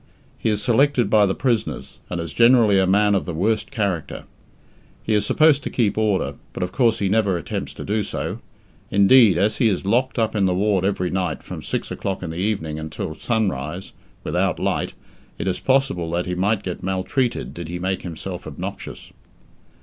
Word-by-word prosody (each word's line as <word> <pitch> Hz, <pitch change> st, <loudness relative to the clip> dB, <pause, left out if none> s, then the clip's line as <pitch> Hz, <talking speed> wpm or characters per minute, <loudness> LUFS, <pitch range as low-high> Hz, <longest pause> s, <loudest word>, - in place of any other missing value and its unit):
He -, -, -1 dB
is 105 Hz, -1 st, -1 dB
selected 125 Hz, -2 st, +2 dB
by 105 Hz, -2 st, +5 dB
the 95 Hz, -, -1 dB
prisoners, 115 Hz, -5 st, -2 dB
and 90 Hz, -, -3 dB
is 85 Hz, -1 st, -5 dB
generally 115 Hz, -4 st, +5 dB
a 95 Hz, -, +2 dB
man 105 Hz, +2 st, +3 dB
of 95 Hz, -, 0 dB
the 85 Hz, -, -4 dB
worst 105 Hz, +6 st, 0 dB
character. 100 Hz, -, -2 dB, 0.8 s
He 110 Hz, -, 0 dB
is 105 Hz, -1 st, +2 dB
supposed 155 Hz, -2 st, +4 dB
to -, -, -4 dB
keep 110 Hz, -5 st, +1 dB
order, 105 Hz, -3 st, 0 dB, 0.2 s
but -, -, -3 dB
of 90 Hz, -, -3 dB
course 115 Hz, -1 st, +2 dB
he 100 Hz, -, 0 dB
never 100 Hz, -2 st, +2 dB
attempts -, -, -4 dB
to -, -, -7 dB
do 105 Hz, +2 st, 0 dB
so; -, -, -4 dB, 0.5 s
indeed, 100 Hz, -1 st, +6 dB
as 105 Hz, +4 st, +1 dB
he 115 Hz, -, +3 dB
is 95 Hz, -2 st, -2 dB
locked 120 Hz, +4 st, +1 dB
up 110 Hz, -1 st, 0 dB
in 100 Hz, -2 st, +2 dB
the 90 Hz, -, +1 dB
ward 100 Hz, -1 st, +1 dB
every 90 Hz, -2 st, 0 dB
night 90 Hz, -5 st, -2 dB
from -, -, -7 dB
six -, -, -4 dB
o'clock 95 Hz, -1 st, -3 dB
in 80 Hz, -, -4 dB
the -, -, -7 dB
evening 90 Hz, -6 st, -2 dB
until 80 Hz, 0 st, -5 dB
sunrise, 95 Hz, -, -2 dB, 0.3 s
without -, -, 0 dB
light, -, -, -1 dB, 0.4 s
it -, -, -4 dB
is 95 Hz, -, -1 dB
possible 130 Hz, -11 st, +1 dB
that 85 Hz, +1 st, -1 dB
he 90 Hz, -, -3 dB
might 100 Hz, +3 st, 0 dB
get 90 Hz, -, -5 dB
maltreated 95 Hz, +7 st, -1 dB
did 85 Hz, -1 st, -7 dB
he 85 Hz, +2 st, -4 dB
make 95 Hz, +1 st, -2 dB
himself 90 Hz, +1 st, -7 dB
obnoxious. -, -, -7 dB
100 Hz, 195 wpm, -22 LUFS, 90-110 Hz, 0.8 s, indeed